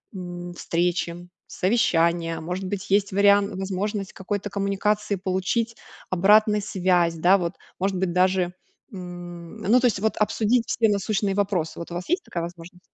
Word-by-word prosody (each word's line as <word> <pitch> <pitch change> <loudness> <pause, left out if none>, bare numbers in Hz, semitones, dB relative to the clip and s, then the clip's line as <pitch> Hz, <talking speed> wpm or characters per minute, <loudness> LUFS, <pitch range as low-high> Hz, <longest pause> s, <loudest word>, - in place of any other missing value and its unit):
м, 175 -1 -6
встречи, 175 0 -1 0.2
совещания, 170 -5 +1
может 180 +4 -4
быть 195 +1 -4
есть 200 0 +2
вариан 200 0 +4
возможность 195 +1 -3
какой-то 205 +1 -4
коммуникации 200 +1 0
получить 195 +5 -1 0.3
обратный 210 +3 +4
связь, 180 -4 +1
да, 180 +4 +4
вот. 175 -2 -2 0.3
Может 190 0 0
быть 185 -1 0
даже, 180 0 +2 0.4
м, 175 0 -9
ну, 225 +4 +4
то 250 - +1
есть 210 -5 0
обсудить 220 +2 +1
вот - - -13
все 225 -1 +2
насущные 200 -1 0
вопросы. 195 -6 -1
Вот 170 - -7
у - - -5
вас 175 +1 -5
есть 355 +2 +1
такая 170 - -4
возможность? 175 +1 -9
190 Hz, 155 wpm, -24 LUFS, 175-205 Hz, 0.4 s, вариан